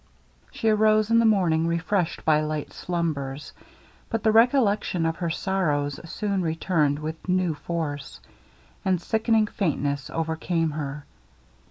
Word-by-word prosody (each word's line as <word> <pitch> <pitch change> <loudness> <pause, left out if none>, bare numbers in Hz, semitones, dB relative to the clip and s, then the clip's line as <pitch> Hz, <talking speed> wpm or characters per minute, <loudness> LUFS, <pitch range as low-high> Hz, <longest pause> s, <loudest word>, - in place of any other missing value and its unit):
She 225 - -3
arose 215 0 +3
in 230 - +6
the 230 - +4
morning 170 -6 +2
refreshed 170 +2 -1
by 155 -1 +4
light 155 -1 -3
slumbers; 150 -5 -3 0.6
but 225 -2 -2
the 220 - +4
recollection 220 -7 +3
of 165 0 -1
her 170 - -2
sorrows 155 -6 -1
soon 200 0 -1
returned 160 -3 +1
with 160 +4 -6
new 180 -2 +2
force, 150 -2 -5 0.6
and 185 -2 +1
sickening 220 +3 +2
faintness 145 -8 -2
overcame 165 0 -1
her. 145 -1 -5
170 Hz, 130 wpm, -25 LUFS, 155-205 Hz, 0.6 s, in